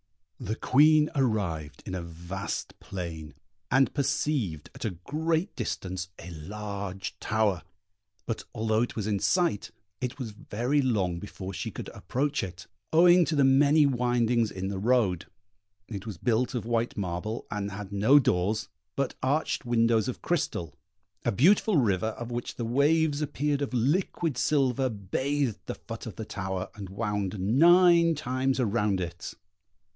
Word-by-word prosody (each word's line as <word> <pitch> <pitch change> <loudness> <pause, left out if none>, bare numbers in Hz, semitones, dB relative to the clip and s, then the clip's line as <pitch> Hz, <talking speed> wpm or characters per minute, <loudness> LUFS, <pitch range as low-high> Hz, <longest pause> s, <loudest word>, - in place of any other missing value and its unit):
The 110 - -3
Queen 150 +4 +4
arrived 95 - -1
in 95 - -5
a 95 - -2
vast 85 +3 -5
plain, 85 -5 -6 0.3
and 135 +1 +3
perceived, 130 - -1
at - - -9
a 110 - 0 0.2
great 160 +4 -1
distance, 95 -6 -4
a 85 +1 -9
large 100 +3 -5
tower; 105 -5 +1 0.6
but 115 - -3
although 110 0 +1
it 120 - -2
was 110 - -2
in 105 -2 0
sight, 175 - +1 0.3
it 125 -1 -3
was 125 -6 -5
very 120 +7 -1
long 95 -10 0
before 95 0 -7
she - - -4
could - - -7
approach 135 - -2
it, 90 -2 -7 0.3
owing 175 +2 +7
to 155 - -1
the 140 - +4
many 140 +3 +5
windings 120 -3 +2
in 95 0 -4
the 100 -1 -3
road. 105 -6 +2 0.6
It 105 -1 -7
was 105 -6 -5
built 120 +5 0
of 120 - -2
white 115 0 -1
marble, 95 +3 -3
and 105 -1 -2
had 100 0 -7
no 105 +8 +5
doors, 105 -3 +1 0.3
but 140 -1 -1
arched 145 +5 0
windows 115 -1 +3
of 130 - -5
crystal; 90 - -1 0.5
a 120 - +1
beautiful 180 - +4
river, 110 -5 +2
of 120 +2 -5
which 120 0 -4
the 120 - -3
waves 145 +4 +2
appeared 145 0 -1
of 135 -2 -2
liquid 155 +4 +1
silver, 135 -3 +2
bathed 125 +5 -1
the - - -3
foot - - -8
of - - -7
the - - -6
tower, 95 0 -4
and 100 -2 -8
wound 105 -1 -2
nine 170 - +5
times 130 -2 -1
around 105 -4 +1
it. 85 -2 -5
115 Hz, 155 wpm, -28 LUFS, 95-140 Hz, 0.6 s, owing